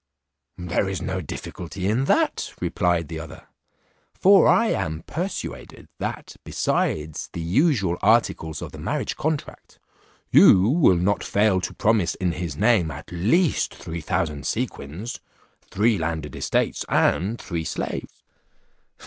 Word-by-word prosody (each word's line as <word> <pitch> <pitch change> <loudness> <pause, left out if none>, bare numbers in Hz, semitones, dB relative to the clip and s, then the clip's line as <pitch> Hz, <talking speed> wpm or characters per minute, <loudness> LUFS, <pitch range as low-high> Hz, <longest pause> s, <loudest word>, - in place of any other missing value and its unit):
"There 90 +2 -1
is 95 - -3
no 95 0 -3
difficulty 90 +4 -6
in 115 +6 +1
that," - - +1
replied 85 -2 0
the 80 +1 -6
other; 80 -2 -10 0.7
"for 195 0 +6
I 230 -1 +4
am 80 -4 -2
persuaded, 180 +5 -6
that - - -5
besides 75 0 -1
the - - -5
usual 100 - +1
articles 80 -2 +1
of - - -7
the - - -10
marriage - - -2
contract, 155 -1 -4 0.5
you 95 +2 +7
will 135 - +4
not 95 +4 +1
fail 100 -2 +2
to - - -4
promise 110 -6 +2
in 90 -2 -1
his 85 -4 -5
name 105 -6 +3
at 75 +1 -9
least 120 - +1
three 85 +1 -6
thousand 75 -2 -2
sequins, 85 +12 -4 0.5
three 105 0 +2
landed 80 -3 -3
estates, - - 0
and 105 +6 +1
three 85 -3 -4
slaves." - - -5
90 Hz, 130 wpm, -24 LUFS, 80-110 Hz, 0.7 s, you